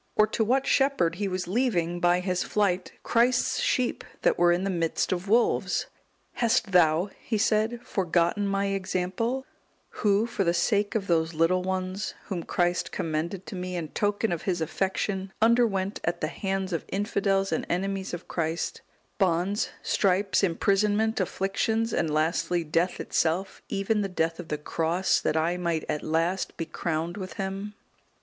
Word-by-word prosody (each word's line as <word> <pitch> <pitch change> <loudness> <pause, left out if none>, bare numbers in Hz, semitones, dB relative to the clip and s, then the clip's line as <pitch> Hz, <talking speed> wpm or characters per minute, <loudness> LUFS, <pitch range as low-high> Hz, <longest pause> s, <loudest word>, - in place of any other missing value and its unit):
or 215 - +6
to 220 +1 0
what 260 +5 +2
shepherd 270 - +2
he 200 0 -1
was 185 -1 -3
leaving, 180 -6 0
by 175 +1 +3
his 180 -1 -1
flight, 195 -3 0
Christ's 240 +1 +2
sheep 270 - 0 0.2
that - - +4
were 175 0 +4
in 175 +2 +1
the 195 - 0
midst 165 -3 0
of 185 +1 -2
wolves? 235 +3 +2 0.5
"Hast 230 -3 +1
thou," 175 +1 +4
he 220 - -2
said, 220 +3 +1
"forgotten 180 +2 +1
my 195 0 0
example, 195 +7 -1 0.5
who, 210 0 +3
for 230 -4 -1
the 170 -1 +2
sake 205 +1 +1
of 210 -3 0
those 160 -2 +1
little 165 +3 +3
ones, 185 +1 -3
whom 185 -4 -3
Christ 175 +1 0
commended 165 +4 -3
to - - -7
me 180 0 -4
in 165 -3 -3
token 205 +3 0
of 170 -2 -2
His 180 -3 -1
affection, 190 +3 -2
underwent 220 -4 +2
at 170 - -1
the 155 - -1
hands 190 +1 -2
of 165 - -1
infidels 195 -1 0
and - - 0
enemies 195 +2 -1
of 175 0 -6
Christ, 165 0 -2 0.4
bonds, 190 +2 +1
stripes, 195 0 +2
imprisonment, 205 +4 +2
afflictions, 215 +4 0
and 155 - 0
lastly, 165 +3 +1
death 165 +3 0
itself, 175 +4 -1
even 205 +2 0
the 200 - -2
death 165 -2 -1
of 175 - -7
the 150 - -2
cross, 165 +4 +1
that 160 - 0
I 170 +3 +1
might 170 -3 -1
at 150 - -2
last 165 +4 -1
be 165 - -2
crowned 165 +1 -3
with 185 -2 -6
Him?" 195 +2 -4
190 Hz, 165 wpm, -27 LUFS, 170-205 Hz, 0.5 s, or